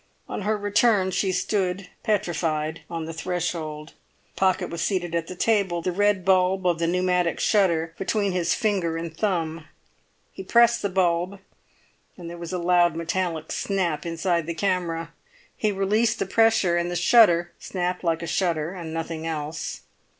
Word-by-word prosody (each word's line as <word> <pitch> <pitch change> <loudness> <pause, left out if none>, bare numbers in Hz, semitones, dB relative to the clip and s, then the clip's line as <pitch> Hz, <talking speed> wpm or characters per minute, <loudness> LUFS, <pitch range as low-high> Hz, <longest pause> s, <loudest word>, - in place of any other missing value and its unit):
On - - -5
her 210 +2 0
return 205 -1 +2
she 190 +1 0
stood 185 -1 -1
petrified 165 -7 -1
on 165 -2 -4
the 165 - -6
threshold. 160 -3 -4 0.4
Pocket 190 -1 +1
was 170 -1 -4
seated 175 -3 -1
at 170 -1 -1
the 185 - -7
table, 190 -5 +1
the 185 - 0
red 205 0 +1
bulb 185 0 +3
of 175 -2 +2
the 165 - +1
pneumatic 180 -1 +1
shutter 170 -6 +2
between 200 0 0
his 175 -1 +1
finger 185 -7 0
and 165 -1 -6
thumb; 165 -5 -1 0.7
he - - -8
pressed 235 +3 +4
the 200 - -1
bulb, 180 0 0 0.8
and 175 -2 -9
there 170 0 -8
was 170 -1 -6
a 185 - -1
loud 175 -1 +3
metallic 170 -1 -2
snap 185 -6 -1
inside 170 0 -1
the 170 - -3
camera; 165 -3 -1 0.4
he 215 - 0
released 210 +4 +1
the - - -1
pressure, 220 -4 +3
and 170 0 -1
the 175 - -3
shutter 175 -2 +5
snapped 180 -1 -3
like 165 -1 0
a - - -2
shutter 170 -1 -1
and 170 -4 -7
nothing 165 0 -4
else. 155 -1 -4
175 Hz, 165 wpm, -24 LUFS, 165-195 Hz, 0.8 s, shutter